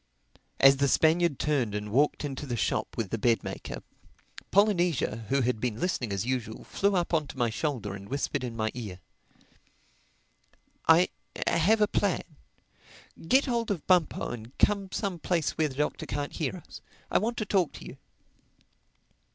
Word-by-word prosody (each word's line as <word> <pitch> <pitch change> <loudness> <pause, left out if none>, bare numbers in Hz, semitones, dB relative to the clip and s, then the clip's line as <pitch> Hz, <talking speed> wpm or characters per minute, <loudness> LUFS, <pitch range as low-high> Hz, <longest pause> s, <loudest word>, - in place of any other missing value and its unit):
As 135 0 +7
the 140 +1 +2
Spaniard 160 0 +3
turned 130 -9 0
and 105 0 -4
walked 145 +5 +2
into 145 0 -5
the 120 -2 -2
shop - - -1
with 110 -5 -2
the 115 - -1
bed 115 0 +2
maker, - - -6 0.7
Polynesia, 175 - +2
who 140 0 +2
had 125 -2 0
been 120 -3 -2
listening 135 - -1
as 100 +2 -1
usual, 120 -3 -3
flew 200 0 0
up 175 -1 0
on 155 -3 +2
to 135 - -10
my 120 -3 +1
shoulder 115 -7 -2
and 100 0 -9
whispered 140 -1 -2
in 120 -2 -4
my 110 -1 -1
ear, 105 -7 -6 1.9
"I 165 +3 +6 0.4
have 210 +7 +3
a 210 - +5
plan. 200 -3 0 1.0
Get 265 +7 +5
hold 235 -3 -1
of 190 -7 -2
Bumpo 180 -5 +2
and 120 +1 -9
come 200 -2 +2
some 195 -5 -2
place 165 -2 0
where 155 -1 0
the 130 - -10
Doctor 150 +2 -2
can't 145 +1 -3
hear 155 -1 -2
us. - - -11 0.3
I - - +4
want 230 +4 -2
to 215 - -1
talk 190 -4 +1
to - - -10
you." - - -9
145 Hz, 170 wpm, -28 LUFS, 120-180 Hz, 1.9 s, As